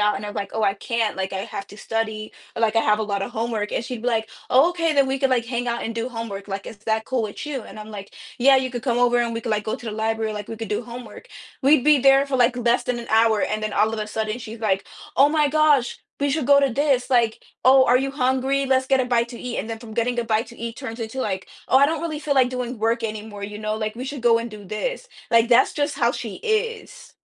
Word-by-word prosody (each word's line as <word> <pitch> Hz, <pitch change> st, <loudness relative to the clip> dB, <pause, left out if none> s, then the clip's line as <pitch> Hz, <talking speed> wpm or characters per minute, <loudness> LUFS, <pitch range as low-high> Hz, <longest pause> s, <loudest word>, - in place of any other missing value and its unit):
out?" 210 Hz, 0 st, +2 dB
And 205 Hz, -, -6 dB
I'm 205 Hz, -, -7 dB
like, 200 Hz, -, -4 dB
"Oh, 220 Hz, -, -1 dB
I 200 Hz, -1 st, +2 dB
can't," 225 Hz, 0 st, -1 dB
like, 190 Hz, 0 st, -3 dB
"I 190 Hz, -, -2 dB
have 195 Hz, -, -6 dB
to 205 Hz, -, -12 dB
study," 220 Hz, -1 st, -3 dB, 0.2 s
like, 225 Hz, -1 st, +1 dB
"I 225 Hz, -, +6 dB
have 210 Hz, -1 st, +2 dB
a -, -, +1 dB
lotta 200 Hz, -2 st, -2 dB
homework." 220 Hz, -2 st, -3 dB
And, -, -, -1 dB
she'd 240 Hz, -2 st, -6 dB
be 245 Hz, -, +1 dB
like, 225 Hz, -2 st, 0 dB, 0.2 s
"Oh, 270 Hz, +6 st, +6 dB
okay, 335 Hz, -2 st, 0 dB
then 280 Hz, -2 st, +4 dB
we 265 Hz, +1 st, -1 dB
could, 270 Hz, 0 st, +1 dB
like, 240 Hz, -2 st, +1 dB
hang 245 Hz, 0 st, -2 dB
out 235 Hz, 0 st, -2 dB
and 225 Hz, -, -4 dB
do 230 Hz, +2 st, -2 dB
homework," 225 Hz, -5 st, -6 dB
like, 195 Hz, 0 st, -5 dB
"Is 215 Hz, -, -9 dB
that 220 Hz, +1 st, -1 dB
cool 255 Hz, -1 st, -1 dB
with 210 Hz, -2 st, -5 dB
you?" 285 Hz, -4 st, -4 dB
And, 215 Hz, -, -11 dB
I'm 215 Hz, 0 st, -9 dB
like, 200 Hz, -2 st, -9 dB, 0.2 s
"Yeah, 270 Hz, +2 st, +6 dB
you 260 Hz, -1 st, 0 dB
could 245 Hz, -2 st, -5 dB
come 240 Hz, -3 st, 0 dB
over 245 Hz, 0 st, +3 dB
and 235 Hz, -1 st, 0 dB
we 230 Hz, -, -3 dB
could, 230 Hz, -, -4 dB
like, 210 Hz, -1 st, 0 dB
go 215 Hz, -, -2 dB
to 240 Hz, -, -11 dB
the 220 Hz, -, -3 dB
library," 220 Hz, 0 st, -1 dB
like, 210 Hz, -1 st, -6 dB
"We 225 Hz, -, -6 dB
could 225 Hz, 0 st, -6 dB
do 210 Hz, -, -1 dB
homework." 245 Hz, -, -10 dB, 0.3 s
We'd 275 Hz, -1 st, +5 dB
be 300 Hz, -1 st, +6 dB
there 270 Hz, +1 st, +5 dB
for, 275 Hz, -1 st, -1 dB
like, 245 Hz, 0 st, +3 dB
less 240 Hz, 0 st, +1 dB
than 250 Hz, -1 st, -1 dB
an 235 Hz, -, -9 dB
hour, 220 Hz, -1 st, +4 dB
and 215 Hz, 0 st, -1 dB
then 215 Hz, -1 st, -2 dB
all 215 Hz, +2 st, +2 dB
of 225 Hz, -, -3 dB
a 210 Hz, -, -3 dB
sudden, 215 Hz, +1 st, -3 dB
she's 225 Hz, -1 st, -9 dB
like, 195 Hz, -3 st, 0 dB, 0.3 s
"Oh 275 Hz, +2 st, +6 dB
my 300 Hz, -1 st, +2 dB
gosh, 295 Hz, -4 st, +3 dB, 0.2 s
we 285 Hz, -, +2 dB
should 295 Hz, -2 st, -1 dB
go 280 Hz, 0 st, +6 dB
to 275 Hz, -, +3 dB
this," 265 Hz, -1 st, +1 dB
like, 235 Hz, -3 st, +2 dB, 0.2 s
"Oh, 260 Hz, 0 st, +7 dB
are 245 Hz, -, +5 dB
you 270 Hz, +1 st, -1 dB
hungry? 270 Hz, 0 st, 0 dB
Let's 260 Hz, 0 st, +2 dB
get 270 Hz, 0 st, +3 dB
a -, -, +1 dB
bite 235 Hz, -1 st, +1 dB
to 240 Hz, -, -8 dB
eat." 250 Hz, -1 st, -4 dB
And 220 Hz, -, -4 dB
then 225 Hz, -, -4 dB
from 220 Hz, -1 st, -10 dB
getting 240 Hz, +1 st, 0 dB
a 240 Hz, -, 0 dB
bite 225 Hz, +1 st, 0 dB
to 235 Hz, -, -13 dB
eat 230 Hz, 0 st, -5 dB
turns 240 Hz, -4 st, -7 dB
into, 225 Hz, +3 st, -5 dB
like, 190 Hz, -6 st, -3 dB, 0.2 s
"Oh, 260 Hz, -, +6 dB
I 280 Hz, -, +6 dB
don't 320 Hz, +1 st, -2 dB
really 315 Hz, -3 st, -3 dB
feel 295 Hz, -1 st, -1 dB
like 255 Hz, -2 st, +4 dB
doing 250 Hz, -1 st, -4 dB
work 230 Hz, +2 st, 0 dB
anymore," 215 Hz, -2 st, -5 dB
you 210 Hz, +1 st, -7 dB
know, 215 Hz, 0 st, -2 dB
like, 215 Hz, 0 st, -3 dB
"we 250 Hz, -, -5 dB
should 275 Hz, 0 st, -5 dB
go 235 Hz, -1 st, +5 dB
and 235 Hz, 0 st, -5 dB
do 210 Hz, -1 st, -10 dB
this." -, -, -4 dB, 0.2 s
Like, 230 Hz, 0 st, +4 dB
that's 250 Hz, +1 st, +5 dB
just 290 Hz, 0 st, -1 dB
how 235 Hz, 0 st, +2 dB
she 225 Hz, -6 st, -5 dB
is. 445 Hz, 0 st, -3 dB
235 Hz, 290 wpm, -23 LUFS, 220-265 Hz, 0.3 s, Oh